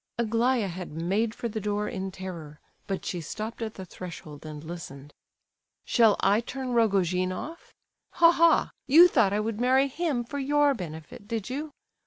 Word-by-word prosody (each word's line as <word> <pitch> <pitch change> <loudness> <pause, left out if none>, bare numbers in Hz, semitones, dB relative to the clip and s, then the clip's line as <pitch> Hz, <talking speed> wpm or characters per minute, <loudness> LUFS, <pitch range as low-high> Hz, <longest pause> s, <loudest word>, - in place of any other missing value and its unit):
Aglaya 230 0 +1
had 180 -2 -7
made 195 +8 -1
for 235 - -3
the 220 -1 -4
door 210 +1 -1
in 190 0 -4
terror, 170 -6 -8 0.3
but 195 -1 -3
she 175 - -3
stopped 215 +9 -6
at 220 -1 -4
the 190 - -7
threshold, 165 -5 -9
and 150 -1 -8
listened. 145 -4 -9 0.7
"Shall 225 -4 +4
I 205 +2 +4
turn 255 +1 -5
Rogojin 185 -5 +2
off? 320 - -7 0.4
Ha! 335 0 +6
ha! 335 -1 +4 0.2
you 325 +6 +9
thought 230 - +3
I 205 - +1
would 220 +1 -2
marry 260 +2 +4
him 285 -3 -1
for 285 +4 -6
your 290 +1 +3
benefit, 165 - -8
did 225 0 -4
you? 295 +4 -4
215 Hz, 170 wpm, -27 LUFS, 180-255 Hz, 0.7 s, you